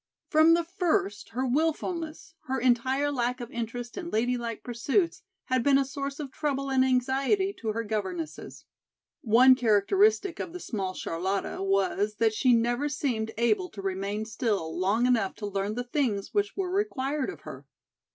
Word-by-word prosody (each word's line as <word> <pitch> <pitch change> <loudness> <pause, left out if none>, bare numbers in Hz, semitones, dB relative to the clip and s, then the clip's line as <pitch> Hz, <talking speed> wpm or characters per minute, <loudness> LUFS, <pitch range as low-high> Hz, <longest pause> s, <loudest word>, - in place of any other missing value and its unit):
From 315 +1 +6
the 340 - +1
first 330 - -1
her 255 +3 -2
wilfulness, 320 +3 -2
her 265 +1 -1
entire 260 +4 +2
lack 250 -1 -1
of 240 -2 -7
interest 235 +1 -5
in 345 -2 -6
ladylike 235 -1 -1
pursuits 290 - 0 0.2
had 255 -1 +1
been 275 +2 +4
a 275 - +2
source 275 +1 -5
of 285 -3 -5
trouble 275 -2 -2
and 260 -1 +4
anxiety 265 - +1
to 225 - -6
her 230 +1 -2
governesses. 185 -8 -5 0.6
One 250 +3 +6
characteristic 335 - +2
of 335 - -5
the 360 - -6
small 195 - -4
Charlotta 190 +4 -2
was 195 +2 +1
that 225 0 +2
she 250 +3 +3
never 240 +4 +2
seemed 250 -7 -1
able 360 - +1
to 200 - -9
remain 195 +3 -2
still 210 -7 -2
long 200 +6 +1
enough 230 -6 +1
to 210 - -6
learn 200 +1 -2
the 245 - -2
things 245 -6 -1
which 410 -1 0
were 370 -2 -1
required 300 -8 -1
of - - -8
her. - - -10
250 Hz, 165 wpm, -28 LUFS, 215-295 Hz, 0.6 s, From